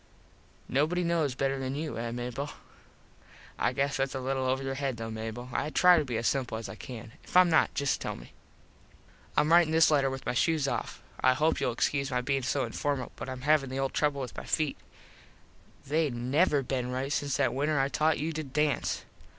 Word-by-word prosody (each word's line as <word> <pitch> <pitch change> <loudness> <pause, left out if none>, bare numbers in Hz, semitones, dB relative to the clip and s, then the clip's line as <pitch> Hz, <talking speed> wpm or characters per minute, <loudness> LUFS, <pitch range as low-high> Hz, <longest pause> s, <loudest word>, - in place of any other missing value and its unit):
Nobody 155 +7 +1
knows 165 -6 +1
better 135 0 0
than 130 0 -3
you, 155 +1 -3
eh 115 0 -3
Mable? 125 +4 -4 1.1
I - - +2
guess 140 +1 0
thats 135 0 -1
a - - -2
little 130 0 -1
over 130 +1 0
your 135 0 -2
head 135 -2 -2
though, 115 0 -5
Mable. 110 +3 -6
I - - -1
try 180 +2 +6
to - - 0
be 125 -5 -3
as 115 - -3
simple 130 -5 -1
as 115 - -6
I - - -7
can. 115 0 -9
If - - -13
Im 180 -2 +7
not 160 - +3
just 140 -1 0
tell - - -3
me. - - -13 1.0
Im 150 - +4
ritin 170 -2 +6
this 160 0 +5
letter 140 -2 +3
with 135 0 -6
my 120 - -1
shoes 155 +3 +2
off. - - -4 0.2
I 130 - +4
hope 155 +4 +2
youll - - +1
excuse 140 +4 0
my 125 -2 0
bein 135 +1 0
so 135 +2 0
informal 140 -3 -2
but - - -6
Im 130 -1 -6
havin 145 -1 +3
the 130 - -4
old 135 0 -1
trouble 145 -2 +1
with 125 - -6
my - - -6
feet. 155 -3 0 1.1
They 155 +2 +1
never 135 +5 +1
been 125 -1 -2
right 130 +3 -2
since 140 -2 -1
that - - +2
winter 145 +2 +1
I 135 - +3
taught 155 +3 +1
you 160 +3 -2
to 155 0 -3
dance. 150 +1 -1
135 Hz, 215 wpm, -29 LUFS, 130-150 Hz, 1.1 s, Im